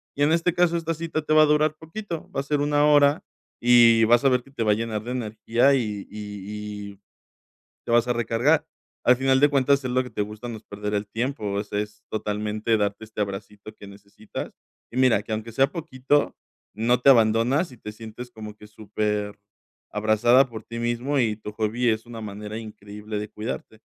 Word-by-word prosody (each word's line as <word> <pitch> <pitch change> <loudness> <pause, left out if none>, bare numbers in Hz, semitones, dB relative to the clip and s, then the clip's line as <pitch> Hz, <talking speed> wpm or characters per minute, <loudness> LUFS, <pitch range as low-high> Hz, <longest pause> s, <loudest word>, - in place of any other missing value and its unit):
Y 145 - -4
en 145 +2 +4
este 170 +1 +2
caso 175 -1 +2
esta 165 0 -2
cita 160 -1 -3
te 155 - 0
va 155 - +7
a 155 - +7
durar 150 0 +3
poquito. 165 +2 -7
Va 135 - -1
a - - -7
ser 145 0 -1
1 145 0 +2
hora 145 0 +4 0.4
y 120 -1 +6
vas 120 +3 +4
a 135 - +5
ver 125 -1 +1
que 135 - -19
te 135 - -6
va 105 -1 +3
a - - +1
llenar 110 -1 -3
de 120 - -5
energía 120 +3 +1
y 105 -6 -2
y 105 0 -7
y 100 - -18 0.9
te - - -4
vas 120 0 +4
a 120 - +1
recargar. 120 +6 +1 0.4
Al 125 - +6
final 130 +1 +2
de 145 - +6
cuentas, 140 0 +2
es 125 - -2
lo 130 +1 +1
que 125 - -9
te 105 - -2
gusta. 105 +3 -7
No 115 - -5
es - - -19
perder 105 +1 -5
el 100 0 -2
tiempo, 110 -4 -2
eso 105 0 -6
es, 105 +1 -4
totalmente 105 +1 -1
darte 105 +1 -2
este 110 -1 -8
abracito 105 +1 -5
que 100 - -12
necesitas 100 +1 -9 0.4
y - - -8
mira 125 -6 +4
que 110 - -6
aunque 110 +2 -3
sea 135 +4 +3
poquito, 145 -4 0 0.4
no 120 +3 +1
te 135 - +6
abandonas 120 +6 +3
y 125 - -14
te 105 - -7
sientes 115 +3 -9
como 110 -2 -9
que 105 0 -14
superabrazada 105 +3 0
por 110 -2 -8
ti 115 +2 -8
mismo 120 +4 -1
y 110 -4 +2
tu 105 - -8
hobby 110 +3 0
es 110 +1 0
una 115 -1 -8
manera 105 +1 -6
increíble 105 -1 -7
de 105 - -5
cuidarte. 110 0 -6
115 Hz, 210 wpm, -24 LUFS, 105-135 Hz, 0.9 s, va